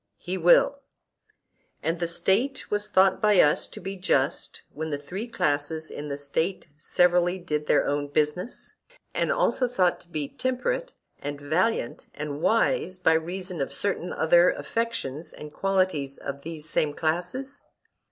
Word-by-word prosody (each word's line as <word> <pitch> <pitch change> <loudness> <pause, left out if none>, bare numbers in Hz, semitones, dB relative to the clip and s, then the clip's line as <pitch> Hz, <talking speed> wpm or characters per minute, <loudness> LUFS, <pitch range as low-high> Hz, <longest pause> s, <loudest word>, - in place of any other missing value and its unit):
He 180 - -4
will. 180 - +5 1.0
And 165 +2 -1
a 170 - +1
State 205 +10 0
was 205 0 0
thought 190 -1 +4
by 210 -3 +5
us 150 - +4
to - - -10
be 195 0 -5
just 145 -7 0
when 160 +1 -4
the 145 - -1
three 185 +11 -6
classes 155 -5 -1
in 150 - -6
the 140 -1 -3
State 160 +7 -2
severally 175 +2 +3
did 150 -4 -3
their - - +4
own 145 0 -1
business; 150 - -2 0.4
and - - +1
also 270 - +2
thought 185 -8 +1
to - - -18
be 155 -4 -3
temperate - - -2 0.2
and 145 0 -5
valiant 160 - 0
and 150 0 -5
wise 225 -4 +2
by 160 -3 +3
reason 180 +1 -2
of 135 - -2
certain 190 -3 -2
other 170 +2 +5
affections 165 - -3
and 150 0 -10
qualities 185 -8 0
of 140 0 -6
these 155 0 -6
same 150 -2 0
classes? 180 - -2
175 Hz, 150 wpm, -26 LUFS, 150-195 Hz, 1.0 s, will